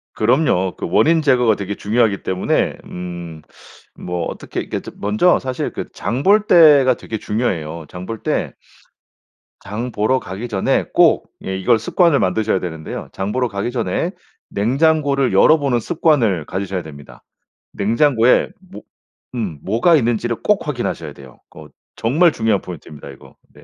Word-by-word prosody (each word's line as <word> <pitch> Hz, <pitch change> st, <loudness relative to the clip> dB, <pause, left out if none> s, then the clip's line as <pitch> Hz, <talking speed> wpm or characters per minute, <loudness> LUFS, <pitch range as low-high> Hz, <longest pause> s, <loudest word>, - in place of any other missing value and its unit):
그럼요. 110 Hz, -, +1 dB
그 -, -, -4 dB
원인 160 Hz, -, +3 dB
제거가 125 Hz, -6 st, +3 dB
되게 100 Hz, 0 st, -5 dB
중요하기 110 Hz, -1 st, 0 dB
때문에 95 Hz, 0 st, 0 dB
음 85 Hz, -3 st, -8 dB, 0.6 s
뭐 90 Hz, -1 st, -4 dB
어떻게 -, -, -6 dB
이렇게 -, -, -5 dB
먼저 105 Hz, -, +2 dB
사실 130 Hz, -1 st, -4 dB
그 -, -, -5 dB
장 125 Hz, +4 st, -3 dB
볼 210 Hz, +2 st, +4 dB
때가 145 Hz, -7 st, +6 dB
되게 110 Hz, -, -6 dB
중요해요. 85 Hz, -9 st, -3 dB
장 90 Hz, +1 st, -8 dB
볼 115 Hz, 0 st, -7 dB
때 -, -, -1 dB, 1.1 s
장 115 Hz, +5 st, -5 dB
보러 110 Hz, +6 st, +1 dB
가기 95 Hz, +7 st, -7 dB
전에 100 Hz, -4 st, 0 dB
꼭 -, -, +3 dB
예 95 Hz, -, -3 dB
이걸 110 Hz, +5 st, +3 dB
습관을 165 Hz, -, +2 dB
만드셔야 95 Hz, +1 st, 0 dB
되는데요. 80 Hz, -3 st, -6 dB
장 95 Hz, +2 st, -3 dB
보러 125 Hz, +1 st, 0 dB
가기 100 Hz, +3 st, -3 dB
전에 115 Hz, -8 st, -2 dB, 0.4 s
냉장고를 140 Hz, +4 st, +1 dB
열어보는 140 Hz, -6 st, +4 dB
습관을 120 Hz, -, +1 dB
가지셔야 95 Hz, -1 st, -3 dB
됩니다. 70 Hz, -3 st, -13 dB, 0.5 s
냉장고에 115 Hz, +3 st, +2 dB, 0.2 s
뭐 -, -, -9 dB, 0.5 s
음 95 Hz, -11 st, -4 dB
뭐가 120 Hz, -, +3 dB
있는지를 120 Hz, -1 st, -1 dB
꼭 210 Hz, -4 st, +1 dB
확인하셔야 100 Hz, -, -3 dB
돼요. 65 Hz, -3 st, -15 dB
그 -, -, -13 dB, 0.3 s
정말 155 Hz, +9 st, +3 dB
중요한 110 Hz, -5 st, 0 dB
포인트입니다 75 Hz, -4 st, -10 dB
이거 70 Hz, -, -15 dB, 0.2 s
네. -, -, -18 dB
110 Hz, 320 characters per minute, -19 LUFS, 95-130 Hz, 1.1 s, 때가